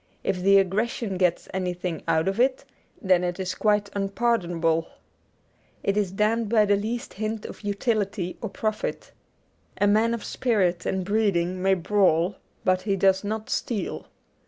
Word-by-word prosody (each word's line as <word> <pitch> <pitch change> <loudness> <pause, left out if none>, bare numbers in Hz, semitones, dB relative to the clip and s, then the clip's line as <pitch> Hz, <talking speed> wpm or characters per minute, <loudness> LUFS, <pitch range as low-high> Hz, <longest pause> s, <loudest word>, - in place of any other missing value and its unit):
If 180 - -1
the 195 +2 +6
aggression 195 +1 0
gets 180 -2 +1
anything 180 -3 -3
out 160 +2 +2
of 195 +3 -1
it, 260 +2 +2 0.3
then 185 -2 +3
it 175 +1 -2
is 185 -1 -2
quite 210 -1 +1
unpardonable. 180 -6 0 1.0
It 200 - +1
is 205 -3 0
damned 215 +2 +1
by 215 -2 +4
the 205 0 +3
least 225 +4 -3
hint 215 +1 -4
of - - -9
utility 205 -3 -1
or 220 - -3
profit. 215 +2 -3 0.7
A 205 - +3
man 220 +3 +3
of 230 - -7
spirit 190 -8 0
and 190 -1 -1
breeding 185 -4 +1
may 190 0 +3
brawl, 180 -1 +2 0.3
but 185 0 +2
he 200 0 0
does 190 0 +3
not 215 +1 -4
steal. 220 -5 -3
195 Hz, 155 wpm, -25 LUFS, 185-215 Hz, 1.0 s, the